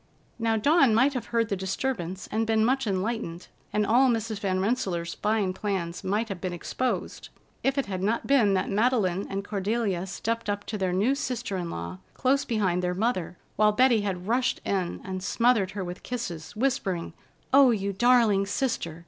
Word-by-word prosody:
Now, 225 -1 +1
Dawn 275 -1 +4
might 265 +5 +4
have 250 - -4
heard 230 -2 0
the 200 - 0
disturbance 190 -1 -3
and 225 +1 0
been 220 -1 +3
much 265 0 +1
enlightened, 190 -3 -3 0.2
and 210 0 +1
all 250 +5 +4
Mrs. 225 -2 -1
Van 190 -2 0
Rensselaer's 190 -5 -1
fine 210 -3 0
plans 185 -4 -3
might 210 +4 0
have 190 -3 -5
been 185 -1 -3
exposed, 250 +8 -3 0.3
if 270 +1 0
it 275 - +1
had 185 -2 -4
not 215 +4 0
been 230 -8 +4
that 185 - 0
Madeleine 205 -4 +1
and 195 +1 -3
Cordelia 200 -2 -1
stepped 230 +3 -3
up 205 0 -2
to 215 - -4
their 190 -1 0
new 205 +9 +2
sister 250 -7 -3
in 175 -2 -3
law 85 - -6 0.2
close 275 +2 +2
behind 195 -7 0
their 180 0 -1
mother, 185 -5 -1 0.2
while 210 0 +4
Betty 245 -1 +4
had 185 -3 -3
rushed 245 +2 +1
in 185 -3 -1
and 185 0 -5
smothered 230 0 +2
her 195 - -1
with 180 0 -7
kisses, 185 -11 -5
whispering: 215 - -1 0.4
"Oh, 275 -1 +8
you 200 -3 0
darling 220 -3 +4
sister! 195 -9 -2
210 Hz, 180 wpm, -27 LUFS, 185-240 Hz, 0.4 s, Oh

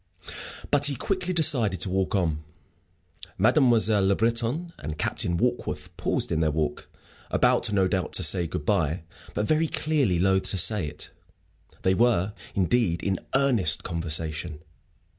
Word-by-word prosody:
But 145 0 +4
he 140 - -2
quickly 185 - -2
decided 125 - +3
to 95 - +2
walk 95 +1 0
on. 80 -5 -1 0.9
Mademoiselle 110 - +3
Le 100 - +3
Breton 120 - -1
and 75 +2 -6
Captain 85 +2 -1
Warkworth 120 +5 -2
paused - - -2
in 80 - 0
their 80 -1 +2
walk, 75 -1 -3 0.4
about - - +2
no 95 -2 +2
doubt 95 -2 -2
to 95 - 0
say 85 +2 +3
good 75 -2 -5
bye, 80 +2 0 0.3
but, 105 - 0
very 155 +6 +1
clearly, 145 - 0
loath 95 +2 +1
to 95 - -1
say 95 -2 +3
it. 75 0 -6 0.7
They 95 - +3
were, 105 -3 +2 0.2
indeed, 95 -2 +1
in 95 -2 -1 0.2
earnest 130 - +2
conversation. 80 -1 -3
95 Hz, 145 wpm, -26 LUFS, 85-120 Hz, 0.9 s, But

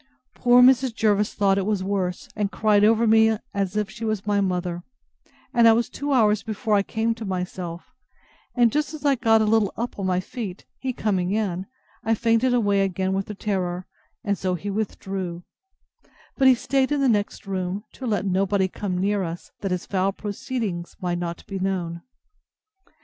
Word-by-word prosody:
Poor 245 0 +5
Mrs. 255 -2 +4
Jervis 210 -2 +1
thought 195 -1 +3
it 190 - -1
was 205 -3 0
worse, 190 -2 -2
and 205 -1 -1
cried 210 -1 +3
over 225 +2 +4
me 220 0 +5
like 215 - -6
as 200 0 -1
if 210 -1 0
she 215 +3 -10
was 215 -3 -2
my 205 -1 +2
mother; 180 -2 -1 0.7
and 235 -1 +6
I 225 - +8
was 235 +1 +1
two 285 0 -4
hours 215 -5 +4
before 220 0 -2
I 205 - +5
came 225 +3 -1
to 225 0 -8
myself; 180 -3 -5 0.6
and 240 -2 +4
just 300 +3 -1
as 300 - -9
I 285 - +5
got 225 -3 +3
a - - +1
little 215 -2 +3
up 235 -2 -4
on 195 - -1
my 180 -1 +1
feet, 195 -1 -6
he 265 - -2
coming 195 -6 -1
in, 195 -3 -1 0.4
I 225 0 +2
fainted 230 +3 +2
away 205 -5 +2
again 190 0 0
with 195 0 -1
the 210 - -6
terror; 185 -3 -2 0.4
and 200 -1 -1
so 185 -1 0
he 200 +4 -4
withdrew: 190 -4 -4 0.9
but 270 - +4
he 260 - +7
staid 270 +3 0
in 290 - +1
the 275 - +3
next 210 -4 0
room 190 +1 -3
to 260 - -6
let 205 -4 0
nobody 190 0 +1
come 185 -1 -4
near 200 +2 +1
us, 170 -1 -6
that 195 - -3
his 180 -1 -2
foul 195 0 0
proceedings 205 -3 -4
might 175 -3 -2
not 170 -1 -5
be 195 -1 -5
known. 180 -3 -2
205 Hz, 195 wpm, -24 LUFS, 185-225 Hz, 0.9 s, I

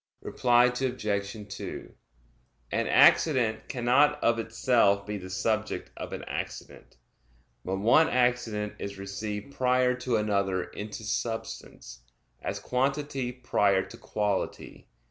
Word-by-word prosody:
Reply 120 -1 +3
Obj. 125 0 -1 0.5
2: 100 - -7 0.8
An - - 0
accident 115 -8 +4
cannot 140 +4 +3
of 115 0 +3
itself 115 -3 +2
be 105 -1 -4
the 95 0 -9
subject 110 +3 -2
of - - -7
an - - -5
accident; - - -7 0.7
but 95 - -2
one 120 +11 +5
accident 125 -4 0
is 100 0 -6
received 105 +5 -5
prior 125 -1 +2
to 125 -1 -2
another 100 -3 0
into 105 +4 -7
substance, 110 - -5 0.4
as - - -3
quantity 135 0 -1
prior 100 -6 +1
to - - -12
quality. 105 -2 -3
115 Hz, 115 wpm, -28 LUFS, 105-125 Hz, 0.8 s, one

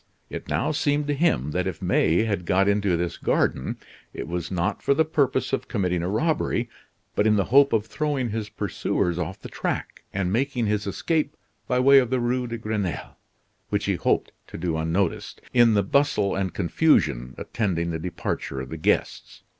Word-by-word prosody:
It - - -6
now - - 0
seemed 145 -1 +1
to - - +2
him 140 - +1
that - - -1
if - - -4
May 85 +7 +2
had 100 -6 -2
got 95 +2 +3
into 100 -3 +2
this 85 0 -2
garden, - - 0 0.4
it - - -5
was 85 0 -3
not 90 +2 -1
for 140 - +2
the 160 - +3
purpose 135 -4 0
of - - -1
committing 90 -5 0
a 90 - -2
robbery, 120 0 0 0.4
but 105 - +2
in 105 - +4
the 100 - +3
hope 140 0 +7
of 110 -2 +1
throwing 135 -2 -2
his 110 -1 -3
pursuers 90 0 -1
off 90 +2 -4
the - - -5
track, - - -4
and 95 -1 -1
making 125 0 0
his 105 -1 -1
escape 155 - -1 0.3
by 125 - +1
way 135 +2 +7
of 125 -3 0
the 130 0 +1
Rue 125 +1 0
de 115 0 -4
Grenelle, 105 -5 -3 0.5
which - - 0
he - - +1
hoped - - 0 0.2
to - - -8
do 85 -1 -1
unnoticed, 80 +3 -1
in 120 -3 +5
the 100 - +3
bustle 105 -3 +2
and 95 -1 -1
confusion 85 - +1
attending 85 -6 -1
the 80 - -3
departure 85 -5 -4
of 65 -1 -6
the 80 - -5
guests. 80 - -1
105 Hz, 190 wpm, -25 LUFS, 90-130 Hz, 0.5 s, hope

